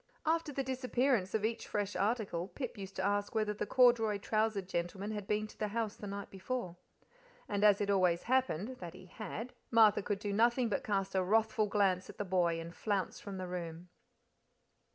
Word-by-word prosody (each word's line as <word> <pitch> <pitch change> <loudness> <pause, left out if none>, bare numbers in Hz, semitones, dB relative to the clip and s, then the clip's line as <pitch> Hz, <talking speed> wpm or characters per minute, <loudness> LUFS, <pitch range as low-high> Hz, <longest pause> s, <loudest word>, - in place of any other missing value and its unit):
And 315 - +4
after 330 -2 -2
the 275 -1 -2
disappearance 255 -5 +1
of 215 -1 +1
each 230 +1 -2
fresh 205 -1 -2
article, 200 -4 0
Pip 250 +3 -5
used 195 -2 -8
to 190 - -1
ask 205 +2 0
whether 215 -1 +1
the 205 - -4
corduroy 240 -4 +4
trousered 215 -1 0
gentleman 190 +4 -3
had 205 -2 -5
been 210 0 +1
to 215 - -14
the 215 - 0
house 220 0 -2
the 205 - -8
night 200 0 -6
before. 195 -2 -4 0.7
And 205 0 -1
as 205 -2 +6
it 200 0 +1
always 180 -3 +3
happened, 255 -2 0
that 170 -2 -7
he 185 - -12
had, 220 +6 -6 0.2
Martha 220 -3 +6
could 200 0 -1
do 205 0 -3
nothing 235 +3 +3
but 205 - -1
cast 195 -2 -1
a 190 -1 +2
wrathful 220 +2 +2
glance 195 -3 +1
at - - -10
the 205 - -2
boy 175 -3 +1
and 165 +1 -7
flounce 200 -3 -2
from 200 -2 -7
the 185 -1 -4
room. 175 -1 -6
205 Hz, 200 wpm, -34 LUFS, 190-225 Hz, 0.7 s, as